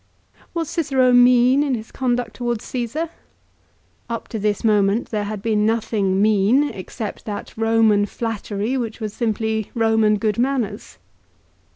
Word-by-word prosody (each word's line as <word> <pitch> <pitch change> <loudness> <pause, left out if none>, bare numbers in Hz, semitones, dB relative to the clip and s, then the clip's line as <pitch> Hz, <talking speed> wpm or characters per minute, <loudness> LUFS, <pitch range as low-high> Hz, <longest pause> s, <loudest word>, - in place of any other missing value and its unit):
Was 330 -2 -1
Cicero 270 -6 +2
mean 245 +2 +5
in 280 -3 +1
his 220 -1 -8
conduct 245 -4 -1
towards 240 -1 -3
Csesar? 265 +7 -3 1.0
Up 230 -1 -4
to 220 - -4
this 205 0 -1
moment 210 0 +2
there 210 -2 -1
had 205 -1 -5
been 215 -2 +1
nothing 215 -3 0
mean, 215 +6 +3
except 205 +3 -7
that 205 -2 -6
Eoman 225 -2 +3
flattery 225 0 -3
which 230 -3 -4
was 215 -2 -4
simply 220 -2 -1
Roman 220 -2 +3
good 215 0 -1
manners. 255 -4 -2
225 Hz, 140 wpm, -21 LUFS, 210-245 Hz, 1.0 s, mean